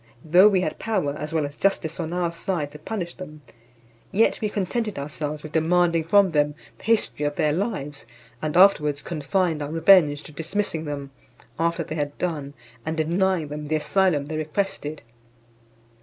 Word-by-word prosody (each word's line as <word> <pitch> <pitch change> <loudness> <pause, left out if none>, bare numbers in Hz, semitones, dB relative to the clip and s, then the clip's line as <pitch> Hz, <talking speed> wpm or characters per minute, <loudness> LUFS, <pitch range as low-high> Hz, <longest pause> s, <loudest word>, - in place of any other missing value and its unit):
Though 180 +6 +7
we 190 -3 +2
had 155 -4 -3
power, 190 -11 -1
as 150 0 -5
well 160 -2 0
as 145 +1 -7
justice 165 -4 0
on 165 -1 -3
our 175 -1 0
side, 170 -3 -3
to 150 - -11
punish 175 +1 -4
them, 155 -5 -10 0.7
yet 220 +4 +2
we 215 - 0
contented 210 +2 -2
ourselves 150 +1 -4
with 155 - -8
demanding 165 0 +2
from 195 +2 +4
them 150 -1 +1 0.2
the - - -14
history 220 -9 +1
of 145 0 -1
their 150 -1 +1
lives; 155 -7 -3 0.3
and 155 +2 -1
afterwards 150 -7 +5
confined 165 +1 -1
our 145 - -3
revenge 160 -2 +5
to - - -11
dismissing 165 +1 -2
them, 140 -2 -5 0.5
after 170 0 +1
they 155 - -6
had 145 -2 -3
done, 150 -5 -3 0.3
and 160 +1 -3
denying 170 0 +1
them 150 0 -6
the 155 - 0
asylum 160 -2 +2
they 155 +1 -4
requested. 155 - -3
160 Hz, 170 wpm, -24 LUFS, 150-185 Hz, 0.7 s, Though